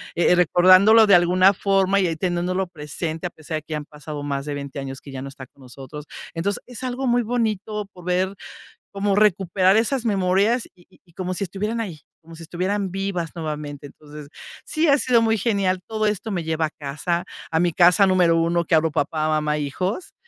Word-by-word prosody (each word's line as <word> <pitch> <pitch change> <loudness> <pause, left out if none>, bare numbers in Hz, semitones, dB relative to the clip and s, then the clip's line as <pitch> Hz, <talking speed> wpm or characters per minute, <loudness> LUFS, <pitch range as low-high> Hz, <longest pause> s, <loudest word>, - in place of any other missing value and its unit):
eh 170 - +3
eh, 180 - +6
recordándolo 185 +6 +6
de 200 - +5
alguna 180 +2 +5
forma 195 0 +2
y 185 - +2
ahí 165 - -2
teniéndolo 180 +2 -1
presente, 160 +1 -5
a - - -8
pesar 155 -1 -6
de 155 - -6
que 155 - -16
ya - - -1
han 150 - -7
pasado 150 -1 -8
más 140 -1 -3
de 145 -1 -4
20 140 0 -6
años 135 0 -6
que 140 - -12
ya 130 - -6
no 135 - -6
está 135 -1 -11
con 140 - -24
nosotros. 135 +3 -10 0.3
Entonces, 185 +5 -2
es 245 -3 -10
algo 255 +1 -3
muy 245 0 +3
bonito 215 -3 -2
poder 180 +2 -1 0.6
como 200 0 -1
recuperar 190 -2 +3
esas 235 +3 +1
memorias 200 +4 +1
y 175 - -23
y 190 - -25
y 170 - -25
como 185 +1 -4
si 200 - -2
estuvieran 210 +5 -3
ahí, 180 -9 -6 0.2
como 165 0 -13
si 165 - -10
estuvieran 190 +4 -2
vivas 190 -3 -3
nuevamente. 150 -2 -5
Entonces, 150 0 -12 0.4
sí, 315 0 0
ha 280 - +6
sido 245 -3 +3
muy 225 0 +2
genial. 195 -4 0
Todo 215 -1 -1
esto 210 +1 -2
me 180 -4 -2
lleva 160 0 -1
a - - -6
casa, 155 +4 -3 0.3
a 160 0 +1
mi 175 -1 +1
casa 180 +3 +5
número 180 -3 +3
1, 170 +1 +1
que 165 - 0
hablo 160 0 +3
papá, 155 +2 -1
mamá, 150 -1 0
hijos, 180 - -3
180 Hz, 210 wpm, -22 LUFS, 155-200 Hz, 0.6 s, eh